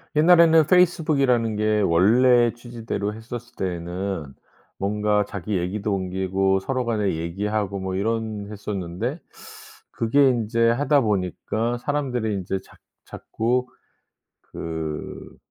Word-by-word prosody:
옛날에는 165 -1 +6
페이스북이라는 145 - +3
게 105 0 +1
원래 120 +7 +4
취지대로 115 -4 -5
했었을 120 +2 -9
때에는 90 -3 -4 0.4
뭔가 105 +1 0
자기 100 0 -3
얘기도 100 +4 -2
옮기고 95 +1 0
서로 130 +5 -2
간에 105 -6 0
얘기하고 100 +4 -2
뭐 95 0 -3
이런 110 0 -2
했었는데 105 - -4 0.7
그게 135 +4 +3
인제 115 -1 +1
하다 145 +4 +2
보니까 110 +3 -1
사람들이 125 -6 -2
인제 95 0 -3
자 - - -20 0.3
자꾸 125 +3 -2 0.7
그 80 -2 -6
110 Hz, 265 characters per minute, -23 LUFS, 95-120 Hz, 0.7 s, 옛날에는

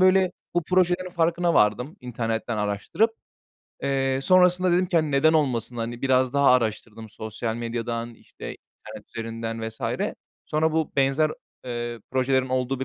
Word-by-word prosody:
böyle 185 0 +4 0.2
bu 175 - +2
projelerin 180 +1 +1
farkına 170 0 +1
vardım 125 - +2
internetten 115 -1 -3
araştırıp. 105 - 0 0.7
Eee, 135 -1 +1
sonrasında 180 +2 +4
dedim 180 +1 +3
ki, 175 -1 0
hani, 155 -2 +2
"Neden 145 +3 +4
olmasın?" 125 -6 0
Hani, 120 +1 -4
biraz 130 -1 +3
daha 140 -1 +4
araştırdım 110 -2 -1
sosyal 110 +1 -4
medyadan, 115 0 -3
işte, - - -12 0.4
internet - - -10
üzerinden 115 0 -4
vs. 110 - -12 0.7
Sonra, 155 +1 +1
bu 160 -1 0
benzer, 135 +3 +3 0.3
eee, 120 -1 -4
projelerin 130 0 +1
olduğu 130 +1 -1
bir - - -1
130 Hz, 145 wpm, -25 LUFS, 115-160 Hz, 0.7 s, böyle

